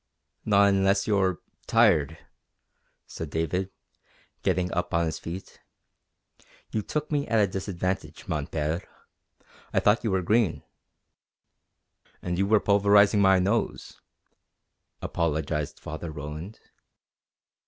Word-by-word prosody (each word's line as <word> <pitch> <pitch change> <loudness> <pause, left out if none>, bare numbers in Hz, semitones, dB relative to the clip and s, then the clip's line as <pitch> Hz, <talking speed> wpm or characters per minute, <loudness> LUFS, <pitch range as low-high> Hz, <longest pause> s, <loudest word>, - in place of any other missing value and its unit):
"Not 100 -1 +5
unless 100 0 +2
you're 95 -4 +1 0.3
tired," 75 +2 +3 0.9
said 80 - -7
David, 80 +5 -1 0.7
getting 90 -1 0
up 90 -1 -1
on 85 0 +2
his 80 - -3
feet. 90 +3 -8 1.1
"You 110 - -1
took 150 +9 -4
me 145 -1 0
at 115 - +1
a 105 - +5
disadvantage, 95 -1 -4
mon - - -2
Père. 80 +3 -2 0.9
I - - +2
thought 105 +3 +3
you 115 - 0
were 95 -2 0
green." 105 -1 +1 1.6
"And 90 0 -3
you 100 - +2
were 110 0 +4
pulverizing 100 0 +4
my 95 -1 +5
nose," 100 +5 -1 1.0
apologized 75 -2 -2
Father 80 +2 -6
Roland. 75 +7 -7
95 Hz, 110 wpm, -26 LUFS, 85-100 Hz, 1.6 s, Not